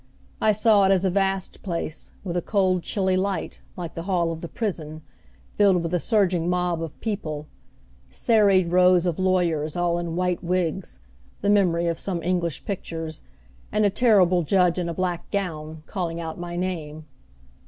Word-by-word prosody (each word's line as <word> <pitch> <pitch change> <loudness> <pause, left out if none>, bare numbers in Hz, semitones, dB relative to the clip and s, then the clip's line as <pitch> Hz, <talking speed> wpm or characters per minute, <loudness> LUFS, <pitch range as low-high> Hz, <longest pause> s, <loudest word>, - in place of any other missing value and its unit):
I 215 - +4
saw 215 -1 +4
it 190 - +4
as 190 0 +3
a 190 - +2
vast 195 0 -1
place, 170 -4 -4
with 180 -3 -4
a 175 - +1
cold 185 -2 +1
chilly 190 0 0
light, 190 +1 -2 0.2
like 170 -2 -5
the 165 - -5
hall 170 -3 +1
of 165 0 -6
the 170 - -5
prison, 160 -7 -4 0.5
filled 190 -4 +3
with 165 +1 -3
a 180 - +2
surging 180 -5 +1
mob 180 -2 0
of 165 -3 -7
people; 155 -9 -3 0.6
serried 195 - +3
rows 180 0 +5
of 175 0 -1
lawyers 170 -5 +1
all 175 -1 +1
in 170 -1 -4
white 180 -1 -1
wigs 175 - -2 0.4
the 205 - +2
memory 175 -4 +3
of 170 -1 -1
some 180 -4 -3
English 170 -4 -1
pictures 165 -5 -5 0.5
and 210 0 +2
a 200 - +3
terrible 190 -6 +4
judge 180 +2 +2
in 170 -1 -2
a - - -2
black 180 -2 -2
gown, 160 -6 -4
calling 170 -4 -3
out 165 0 -5
my 175 0 -5
name. 160 -4 -4
180 Hz, 175 wpm, -24 LUFS, 165-190 Hz, 0.6 s, rows